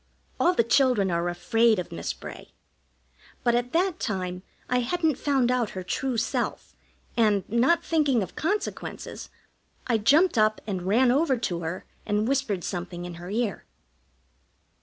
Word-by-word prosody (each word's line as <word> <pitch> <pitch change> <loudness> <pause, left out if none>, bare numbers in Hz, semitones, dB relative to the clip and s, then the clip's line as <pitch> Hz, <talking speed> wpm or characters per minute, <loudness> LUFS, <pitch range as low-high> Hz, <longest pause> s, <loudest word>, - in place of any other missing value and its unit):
All 355 +1 +3
the 230 - +4
children 235 -5 +3
are 170 +1 0
afraid 225 +6 +2
of 180 - -4
Miss 85 -4 -3
Bray; - - -10 0.9
but 240 - +3
at 245 +1 0
that 360 +1 +1
time 185 -3 -3 0.3
I 250 - +2
hadn't 310 +3 0
found 265 -4 +2
out 245 -4 +1
her 185 - -3
true 250 +7 -2
self, - - -2 0.4
and, 210 -4 +2
not 260 +10 +3
thinking 290 -9 +2
of 185 - -9
consequences, 405 +6 -3 0.6
I 230 -3 +1
jumped 290 - +4
up 215 0 +3
and 190 -4 -3
ran 240 +5 +4
over 275 0 +2
to 185 -7 -2
her 170 +2 -5 0.2
and 210 +1 0
whispered 255 -9 0
something 175 -1 -5
in 175 - -6
her 175 - -7
ear. 215 -2 -2
230 Hz, 155 wpm, -26 LUFS, 190-270 Hz, 0.9 s, the